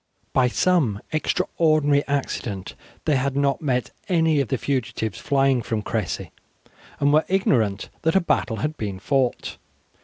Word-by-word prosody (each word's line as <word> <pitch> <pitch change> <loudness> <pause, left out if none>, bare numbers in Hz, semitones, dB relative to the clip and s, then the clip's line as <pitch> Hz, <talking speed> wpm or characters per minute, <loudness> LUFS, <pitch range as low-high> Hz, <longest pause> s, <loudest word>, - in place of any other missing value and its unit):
By 130 -2 +4
some 130 - +2
extraordinary 155 -3 +2
accident 115 -8 -3 0.3
they 150 -3 +3
had 135 +1 -1
not 140 -1 +1
met 125 -5 -1 0.2
any 160 -4 +3
of 135 - -2
the 130 - -1
fugitives 110 -5 -2
flying 135 -3 +2
from 110 -1 -3
Cressy, - - -3 0.7
and 145 0 +3
were 155 +1 +5
ignorant 115 - +1
that 160 +2 +1
a - - +7
battle 155 -9 0
had 150 +9 -2
been 100 -3 -4
fought. 130 +3 -1
140 Hz, 145 wpm, -23 LUFS, 120-155 Hz, 0.7 s, a